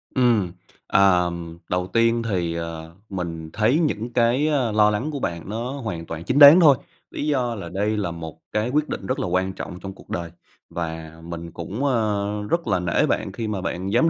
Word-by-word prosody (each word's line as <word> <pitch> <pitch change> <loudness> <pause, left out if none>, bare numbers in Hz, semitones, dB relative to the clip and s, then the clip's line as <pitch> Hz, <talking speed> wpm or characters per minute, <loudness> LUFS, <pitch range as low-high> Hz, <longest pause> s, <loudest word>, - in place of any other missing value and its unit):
Ừm, 115 -8 +3 0.4
ờm, 85 -3 +2
đầu 90 0 0
tiên 115 +2 +2
thì, 85 -4 -1
ờ, 85 0 -6
mình 85 -4 -5
thấy 115 +9 +3
những 120 -7 -1
cái, 125 +5 +3
a, 135 -7 +1
lo 105 0 +5
lắng 120 +9 -1
của 140 - -4
bạn 85 -1 -4
nó 115 +4 -3
hoàn 110 -12 -5
toàn 80 0 -6
chính 135 +8 +1
đáng 145 +5 +11
thôi, 145 -6 +7 0.3
lý 150 - -3
do 125 -5 0
là 85 -5 -7
đây 105 +4 -1
là 90 -5 -1
một 80 -2 -8
cái 110 +3 0
quyết 150 +3 0
định 95 - -4
rất - - -1
là - - -1
quan 95 +1 0
trọng 90 - -7
trong 95 0 -7
cuộc - - -18
đời. 85 -1 -3 0.4
Và 80 -2 -5
mình 85 0 -7
cũng, 100 +10 -5
ơ, 105 -4 0
rất 170 -6 0
là 95 -3 +2
nể 85 -1 +2
bạn 95 - -1
khi 110 +2 -4
mà 100 -3 -2
bạn 90 +2 -3
dám 145 +8 +4
100 Hz, 210 wpm, -23 LUFS, 85-120 Hz, 0.4 s, đáng